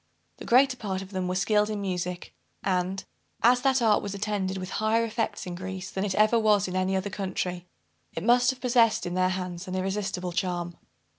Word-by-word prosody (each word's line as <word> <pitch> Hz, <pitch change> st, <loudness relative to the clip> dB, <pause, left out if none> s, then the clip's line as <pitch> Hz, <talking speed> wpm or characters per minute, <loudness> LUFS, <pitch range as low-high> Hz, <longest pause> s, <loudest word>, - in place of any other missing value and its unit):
The -, -, -9 dB
greater 255 Hz, +1 st, +4 dB
part 195 Hz, -4 st, -3 dB
of 190 Hz, -, -13 dB
them 185 Hz, -2 st, -2 dB
were 180 Hz, -, -1 dB
skilled 210 Hz, +2 st, +2 dB
in 210 Hz, -1 st, -3 dB
music; 180 Hz, -2 st, -4 dB, 0.3 s
and, 185 Hz, 0 st, -1 dB, 0.4 s
as 245 Hz, +2 st, +5 dB
that 265 Hz, -2 st, +2 dB
art 215 Hz, -2 st, +4 dB
was 200 Hz, -1 st, -5 dB
attended 200 Hz, -2 st, -2 dB
with 185 Hz, 0 st, -6 dB
higher 225 Hz, +1 st, +2 dB
effects 225 Hz, -2 st, -3 dB
in 180 Hz, -, -5 dB
Greece 185 Hz, +1 st, -6 dB
than 190 Hz, -, -2 dB
it 200 Hz, -2 st, -1 dB
ever 215 Hz, +2 st, +4 dB
was 210 Hz, -3 st, +3 dB
in 185 Hz, -, -5 dB
any 185 Hz, +1 st, +1 dB
other 190 Hz, +1 st, -2 dB
country, 180 Hz, -2 st, -3 dB, 0.5 s
it 165 Hz, -, -3 dB
must 245 Hz, +2 st, +4 dB
have 260 Hz, -1 st, -2 dB
possessed, 235 Hz, -2 st, +3 dB
in 175 Hz, -, -3 dB
their 185 Hz, 0 st, +2 dB
hands, 185 Hz, -1 st, -4 dB
an 185 Hz, -, -4 dB
irresistible 190 Hz, -1 st, -2 dB
charm. 175 Hz, -1 st, -2 dB
190 Hz, 205 wpm, -27 LUFS, 185-215 Hz, 0.5 s, as